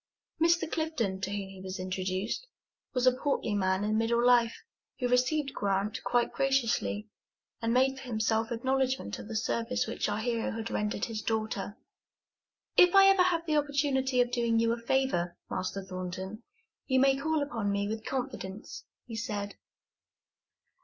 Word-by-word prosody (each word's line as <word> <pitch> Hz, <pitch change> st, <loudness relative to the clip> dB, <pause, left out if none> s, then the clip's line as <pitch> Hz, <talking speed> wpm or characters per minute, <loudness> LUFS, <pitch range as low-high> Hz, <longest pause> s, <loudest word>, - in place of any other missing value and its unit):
Mr. 335 Hz, 0 st, +4 dB
Clifton, 240 Hz, -13 st, -1 dB
to 190 Hz, -, -2 dB
whom 200 Hz, -1 st, -3 dB
he 190 Hz, -1 st, -11 dB
was 190 Hz, 0 st, -5 dB
introduced, 185 Hz, -, -2 dB, 0.4 s
was 250 Hz, -1 st, 0 dB
a 255 Hz, -, +7 dB
portly 260 Hz, -4 st, -1 dB
man 190 Hz, -1 st, +1 dB
in 215 Hz, +1 st, +1 dB
middle 235 Hz, +1 st, +2 dB
life, 240 Hz, -2 st, +4 dB, 0.3 s
who 250 Hz, -, 0 dB
received 265 Hz, +4 st, +1 dB
Grant 200 Hz, +2 st, -1 dB
quite 240 Hz, -1 st, +1 dB
graciously, 255 Hz, -5 st, +1 dB, 0.5 s
and 230 Hz, 0 st, 0 dB
made 265 Hz, +2 st, +3 dB
for 265 Hz, -, -9 dB
himself 225 Hz, -1 st, 0 dB
acknowledgment 260 Hz, -, 0 dB
of -, -, -8 dB
the 225 Hz, -, -6 dB
service 235 Hz, +3 st, 0 dB
which 225 Hz, -1 st, -2 dB
our 205 Hz, -, -1 dB
hero 230 Hz, 0 st, -1 dB
had 225 Hz, 0 st, -4 dB
rendered 210 Hz, 0 st, -1 dB
his 220 Hz, -2 st, -4 dB
daughter. 215 Hz, -2 st, -2 dB, 1.0 s
"If 360 Hz, +1 st, +6 dB
I 390 Hz, 0 st, +9 dB
ever 390 Hz, -1 st, +5 dB
have 345 Hz, -2 st, +2 dB
the 310 Hz, -2 st, +1 dB
opportunity 275 Hz, -3 st, +1 dB
of 245 Hz, 0 st, 0 dB
doing 235 Hz, -2 st, +1 dB
you 230 Hz, 0 st, +3 dB
a -, -, -3 dB
favor, 235 Hz, -9 st, 0 dB
Master 195 Hz, +1 st, -3 dB
Thornton, 185 Hz, +3 st, -6 dB, 0.5 s
you 260 Hz, -1 st, +3 dB
may 270 Hz, 0 st, +5 dB
call 310 Hz, +2 st, 0 dB
upon 225 Hz, -8 st, -2 dB
me 200 Hz, 0 st, 0 dB
with 220 Hz, +1 st, -4 dB
confidence," 240 Hz, -7 st, -5 dB, 0.2 s
he 230 Hz, -, -7 dB
said. 205 Hz, -2 st, -3 dB
230 Hz, 160 wpm, -30 LUFS, 205-265 Hz, 1.0 s, I